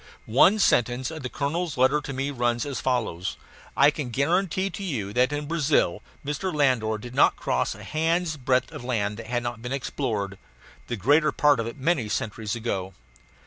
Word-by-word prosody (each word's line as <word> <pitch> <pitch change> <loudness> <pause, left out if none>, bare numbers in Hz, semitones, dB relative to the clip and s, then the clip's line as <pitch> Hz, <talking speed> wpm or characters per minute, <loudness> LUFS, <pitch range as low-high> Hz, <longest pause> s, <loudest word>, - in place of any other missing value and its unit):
One 165 - +5
sentence 125 - +2
of 160 -1 -7
the 130 - -4
colonel's 155 +4 -2
letter 130 +4 +3
to 140 - -6
me 135 +1 -2
runs 120 -2 0
as 140 -2 -4
follows: 115 -9 -1 0.4
"I 140 +2 +6
can 145 -4 -4
guarantee 180 +8 +1
to 200 - -7
you 110 - -3
that 125 +4 +3
in 145 0 -3
Brazil 145 - +1 0.2
Mr. 150 +6 -2
Landor 130 -8 +2
did 120 +3 -9
not - - +4
cross - - -1
a - - -11
hand's 165 +1 0
breadth 130 -2 0
of - - -8
land 105 -5 -1
that 115 - -8
had 120 0 -1
not 120 -1 -4
been 125 +1 -5
explored, 115 -7 -3 0.5
the 120 - -2
greater 145 - +4
part 145 -2 +3
of 115 - -1
it 115 - -7
many 135 -5 0
centuries 105 +1 -2
ago." 95 -5 -3
130 Hz, 185 wpm, -25 LUFS, 115-150 Hz, 0.5 s, I